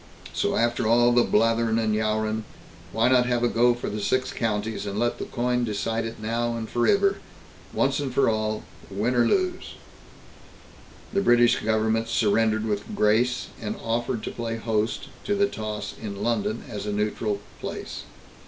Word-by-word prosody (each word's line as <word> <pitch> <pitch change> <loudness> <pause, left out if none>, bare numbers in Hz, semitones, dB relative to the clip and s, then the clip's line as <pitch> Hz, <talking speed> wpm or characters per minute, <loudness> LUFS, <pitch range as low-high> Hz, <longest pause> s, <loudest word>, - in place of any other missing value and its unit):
So - - 0
after 120 -1 +1
all 120 +1 +5
the 120 0 +5
blatherin' 115 +1 +2
and 110 -1 +1
yowrin', 110 0 0 0.5
why 115 +2 +2
not 125 -1 +4
have 120 -1 +1
a - - +4
go 120 +1 +3
for 120 - -5
the 105 0 -3
Six 130 +5 0
Counties, 110 -2 -2
and 100 0 -4
let 120 +2 0
the - - -3
coin 125 0 0
decide 115 +1 -1
it 115 0 -6
now 115 +2 -1
and 110 -1 -4
foriver, 195 - +2 0.5
once 135 +1 +1
and 140 -2 -2
for 135 +1 +3
all, 110 -1 0 0.3
win 105 +6 0
or 120 -1 +3
lose?" 370 -1 0 1.4
The 200 - +2
British 120 -6 +4
Government 110 +1 +1
surrendered 110 0 +2
with 105 -2 -3
grace, 120 +4 +2
and 105 -1 -3
offered 115 0 -2
to - - -4
play 115 -1 -4
host 110 -1 -1 0.2
to 205 - +1
the 200 0 +3
toss 105 - -5
in 100 -2 -5
London, 110 -1 -1
as 105 -1 -6
a - - -1
neutral 105 0 -1 0.2
place. - - -6
115 Hz, 170 wpm, -25 LUFS, 110-120 Hz, 1.4 s, all